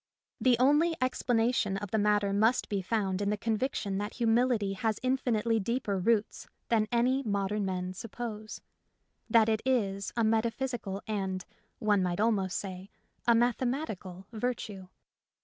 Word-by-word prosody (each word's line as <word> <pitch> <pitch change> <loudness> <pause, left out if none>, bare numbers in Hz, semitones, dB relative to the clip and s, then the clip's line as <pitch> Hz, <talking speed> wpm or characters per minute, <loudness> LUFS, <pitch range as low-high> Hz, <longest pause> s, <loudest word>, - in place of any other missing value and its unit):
The 245 +1 +4
only 295 +7 +4
explanation 235 -5 +1
of 200 -1 -6
the 220 - +2
matter 205 -1 +2
must 220 +5 +2
be 200 -2 -1
found 195 -1 -1
in 200 - 0
the 210 - 0
conviction 220 -3 -1
that 205 +1 -4
humility 230 -3 +2
has 215 +2 -1
infinitely 235 -3 +1
deeper 210 -2 -1
roots 210 +2 0 0.2
than 220 -2 +3
any 250 +3 +2
modern 205 -3 -1
men 185 -1 -3
suppose; 215 +1 -6 0.7
that 225 -2 +5
it 220 -1 +1
is 200 -7 0
a 230 - +3
metaphysical 225 -2 -1
and, 190 -3 -3 0.3
one 210 -2 +2
might 180 0 -1
almost 205 -4 +1
say, 190 0 -6 0.4
a 235 - +6
mathematical 235 - -1
virtue. 215 -5 -4
215 Hz, 140 wpm, -30 LUFS, 195-240 Hz, 0.7 s, a